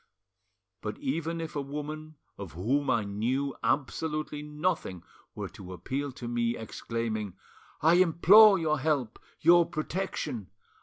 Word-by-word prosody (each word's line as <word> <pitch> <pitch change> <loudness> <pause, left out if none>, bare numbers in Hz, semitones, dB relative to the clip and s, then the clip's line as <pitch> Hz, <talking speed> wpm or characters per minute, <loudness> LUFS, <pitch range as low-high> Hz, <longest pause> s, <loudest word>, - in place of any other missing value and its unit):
But - - -5
even 165 - -2
if 165 -2 -6
a 145 - -1
woman 150 +2 -6 0.2
of 100 -4 -8
whom 130 - 0
I 115 - +2
knew 120 +7 -2
absolutely 150 +2 -1
nothing 150 - -2 0.3
were - - -4
to 95 -1 -10
appeal 140 +9 -4
to 120 - -7
me, 120 0 0
exclaiming, 110 -3 -4 0.5
'I 160 +2 +6
implore 190 +4 +7
your 155 -3 0
help, 135 -6 -1 0.2
your 170 +2 +7
protection! 155 - -4
145 Hz, 125 wpm, -29 LUFS, 115-160 Hz, 0.5 s, implore